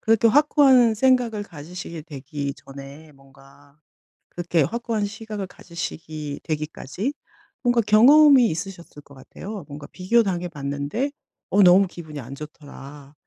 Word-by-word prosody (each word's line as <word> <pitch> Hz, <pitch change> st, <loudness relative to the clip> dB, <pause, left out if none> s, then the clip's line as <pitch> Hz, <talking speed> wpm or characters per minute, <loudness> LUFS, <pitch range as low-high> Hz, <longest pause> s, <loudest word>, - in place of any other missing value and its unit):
그렇게 225 Hz, +1 st, +3 dB
확고한 265 Hz, -4 st, +5 dB
생각을 240 Hz, -3 st, +2 dB
가지시게 170 Hz, 0 st, -9 dB
되기 140 Hz, -2 st, -6 dB
전에 140 Hz, +3 st, -12 dB
뭔가 135 Hz, +1 st, -21 dB, 0.5 s
그렇게 175 Hz, -3 st, 0 dB
확고한 225 Hz, -, -2 dB
시각을 215 Hz, -1 st, -6 dB
가지시기 155 Hz, -4 st, -7 dB
되기까지 155 Hz, -, -4 dB, 0.5 s
뭔가 240 Hz, -1 st, +3 dB
경험이 255 Hz, +5 st, +6 dB
있으셨을 170 Hz, -2 st, -7 dB
것 140 Hz, -, -18 dB
같아요. 195 Hz, +8 st, -9 dB
뭔가 145 Hz, 0 st, -9 dB
'비교당해 185 Hz, -2 st, +1 dB
봤는데 145 Hz, -, -3 dB, 0.4 s
어 200 Hz, +2 st, +4 dB
너무 185 Hz, +2 st, +7 dB
기분이 155 Hz, -4 st, -9 dB
안 130 Hz, +2 st, -9 dB
좋더라. 145 Hz, -1 st, -12 dB
175 Hz, 310 characters per minute, -23 LUFS, 145-220 Hz, 0.5 s, 너무